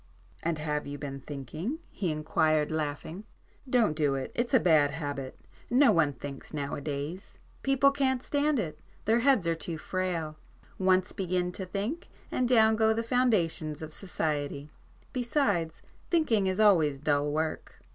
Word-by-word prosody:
"And 165 -1 -1
have 150 -1 -2
you 145 0 -5
been 140 -1 -6
thinking?" 150 - -5
he 185 - -2
inquired 155 0 +1
laughing—"Don't 160 - -2
do 145 -3 +1
it. 135 - -4
It's 240 0 -1
a - - +7
bad 155 -6 +4
habit. 145 -3 -5 0.3
No 270 +4 +5
one 155 -4 +3
thinks 140 +4 -8
now 140 -1 -3
a - - -4
days,—people 180 - -1
can't 265 -2 0
stand 290 0 +1
it—their 200 +5 -2
heads 255 -7 +3
are 165 - +2
too 165 0 -5
frail. 170 -3 -3 0.4
Once 185 -1 +3
begin 180 -1 -1
to 185 +1 -6
think 210 - -3 0.2
and 250 -1 0
down 220 -3 +5
go 220 0 +3
the 230 - -1
foundations 175 - +1
of 155 0 -8
society,—besides 165 - -2 0.3
thinking 235 - +2
is 190 +2 -1
always 165 -10 +5
dull 145 0 +1
work." 155 +1 -3
170 Hz, 145 wpm, -29 LUFS, 150-225 Hz, 0.4 s, a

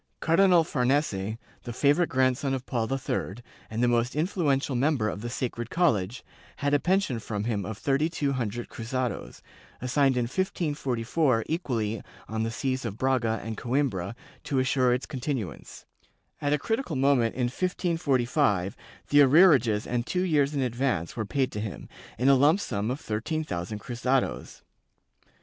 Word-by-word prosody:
Cardinal 175 0 +4
Farnese, 125 - 0 0.2
the 120 - -6
favorite 145 +7 +3
grandson 130 +1 +1
of 130 -1 -6
Paul 115 -1 -2
III, 135 -7 -2 0.3
and 110 +2 -1
the - - +4
most 120 +1 +1
influ 170 +3 -1
ential 135 -1 -3
member 130 -3 +1
of 105 - -4
the 120 - -4
Sacred 120 -1 -3
College, 120 - +1 0.3
had 145 0 -1
a 145 - +5
pension 180 -8 +1
from 105 -2 -4
him 105 -4 -2
of 110 -2 -5
thirty 140 +6 +1
two 145 -4 -1
hundred 120 -2 -3
cruzados, 125 +2 -4 0.4
assigned 130 +1 +2
in 125 - +2
1544 135 -4 0
equally 115 - -2 0.3
on 110 0 -3
the 115 - 0
sees 130 +2 -2
of 110 -3 -4
Braga 120 -4 +1
and 110 +1 -4
Coimbra 120 -7 -1 0.3
to 140 - -1
assure 130 -1 +2
its 125 +1 0
continuance: 130 - -5 0.6
at 145 - 0
a 150 - +3
critical 225 - -2
moment, 130 -4 +2
in 130 - -1
1545, 135 - 0 0.3
the 145 0 +6
arrearages 135 - +5
and 120 0 -2
two 180 0 0
years 150 -5 +2
in 140 - 0
advance 120 -8 -1
were 110 - -2
paid 135 +3 0
to 105 - -4
him, 105 -3 -6 0.3
in 125 - +1
a 140 - +7
lump 145 +7 +4
sum 105 - -2
of 130 +3 -2
thirteen 115 +9 -2
thousand 90 - -4
cruzados. 125 +3 -2
130 Hz, 160 wpm, -27 LUFS, 115-145 Hz, 0.6 s, a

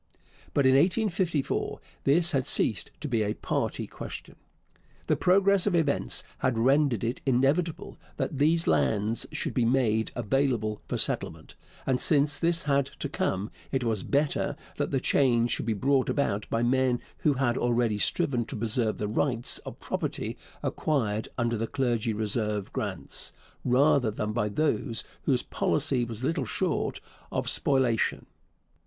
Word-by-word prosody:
But 140 - +3
in 130 - +6
1854 175 -1 +1 0.3
this 165 +6 +3
had 135 -3 0
ceased 110 - +2
to - - -3
be 115 -5 0
a 105 0 -1
party - - -2
question. - - -8 0.7
The - - +2
progress 195 +1 +3
of 190 - +2
events 150 -4 +2 0.2
had 130 -3 0
rendered 135 -1 +2
it 120 +2 -2
inevitable 140 +6 0 0.2
that 140 - -3
these 165 +3 +3
lands 110 +2 +1
should - - -3
be 125 - +1
made 115 -3 +1
available 120 -2 0
for - - -2
settlement; - - -1 0.3
and 130 -1 +1
since 145 -1 +4
this 170 +1 +2
had 140 -2 +1
to - - -3
come, 95 +3 -2 0.2
it 135 -2 0
was 110 -4 0
better 145 +6 0 0.2
that - - -1
the 135 - 0
change 120 -3 +3
should - - -1
be 115 - +2
brought 130 +5 +1
about 105 -8 -1
by 115 +1 0
men 125 0 +2 0.2
who 150 - +2
had 125 -3 0
already 120 -4 +1
striven 140 - +1
to - - -5
preserve 110 0 0
the 105 - -2
rights 120 +2 +2
of - - -10
property - - -3 0.3
acquired 110 -8 -1
under 120 -1 0
the 115 +1 -2
Clergy 120 -5 0
Reserve 105 -1 -2
grants, - - -3 0.3
rather 125 -1 +3
than 105 0 -3
by 105 -2 0
those 115 -3 0 0.2
whose 130 -3 +2
policy 135 -4 0
was 115 +1 -7
little 145 -1 0
short - - -1 0.3
of - - -2
spoliation. 130 -5 +2
125 Hz, 150 wpm, -27 LUFS, 115-145 Hz, 0.7 s, in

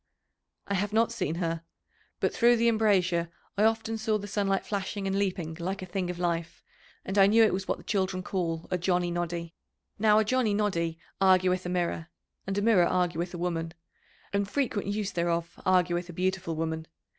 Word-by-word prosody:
"I 200 - -1
have 205 +2 -1
not 225 +1 +3
seen 200 -9 -2
her. 165 -1 -2 0.6
But - - +1
through 240 0 +5
the 235 0 +2
embrasure 185 -7 +2 0.3
I 210 - +3
often 225 0 0
saw 220 -1 +1
the 205 - -7
sunlight 200 -1 0
flashing 200 0 -3
and 195 0 0
leaping 185 -5 -1
like 190 +3 -3
a - - -4
thing 185 0 -3
of 180 - -4
life, 170 -2 -2 0.4
and 195 +1 0
I 195 - +8
knew 225 +3 +6
it 220 - +3
was 190 0 -3
what - - 0
the - - -14
children 190 -3 -1
call 165 -4 -2
a 180 - 0
'Johnny 180 0 +1
Noddy.' 170 -1 -3 0.5
Now 210 0 +5
a 220 - +5
'Johnny 230 -2 +2
Noddy' 170 -6 0 0.2
argueth 185 -1 +4
a - - -3
mirror, 175 -2 -1 0.4
and 195 +1 -2
a 205 - +1
mirror 200 -6 +5
argueth 175 -1 0
a - - -5
woman, 165 -1 -2 0.6
and 200 0 0
frequent 230 -8 -1
use 205 0 -1
thereof 170 0 -1
argueth 180 -1 +2
a - - -7
beautiful 185 -1 -1
woman. 160 0 -3
185 Hz, 190 wpm, -28 LUFS, 170-205 Hz, 0.6 s, I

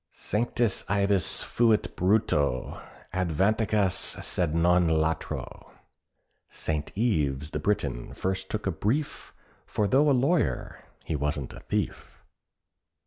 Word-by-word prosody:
Sanctus 115 0 0
Ivus 100 -1 +1
fuit 110 -6 +2
Brito, 75 - +1 0.3
advocatus 95 +3 +1
sed 85 -3 -1
non 90 +1 +4
latro. 80 0 -2 0.8
"Saint 75 -2 -3
Ives 75 - 0
the - - -2
Briton 70 -12 -1
first 95 0 -2
took 110 - -3
a 95 - +1
brief, 135 +12 -2 0.4
For 105 - 0
though 140 +7 +4
a - - +5
lawyer 140 +6 0 0.2
he 80 - -2
wasn't 75 -2 -2
a - - -9
thief." - - -4
95 Hz, 110 wpm, -27 LUFS, 80-110 Hz, 0.8 s, a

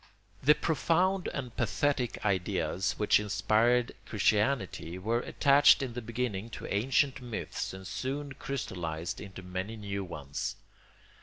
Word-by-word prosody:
] - - -31
The 150 - +9
profound 175 +5 +1
and 125 -4 -5
pathetic 125 0 0
ideas 95 -3 0
which 105 - +4
inspired 110 +4 +2 0.2
Christianity 105 -4 +1
were 110 +5 0
attached 140 +2 +5
in 125 -3 -4
the 125 - -4
beginning 115 -2 -3
to - - -8
ancient 130 +5 +2
myths 120 -3 -4
and 95 0 -9
soon 140 +6 -3
crystallised 85 -12 -4
into 95 -2 -9
many 95 +4 -4
new 100 -2 -4
ones. 75 -6 -4
110 Hz, 130 wpm, -30 LUFS, 95-130 Hz, 0.2 s, The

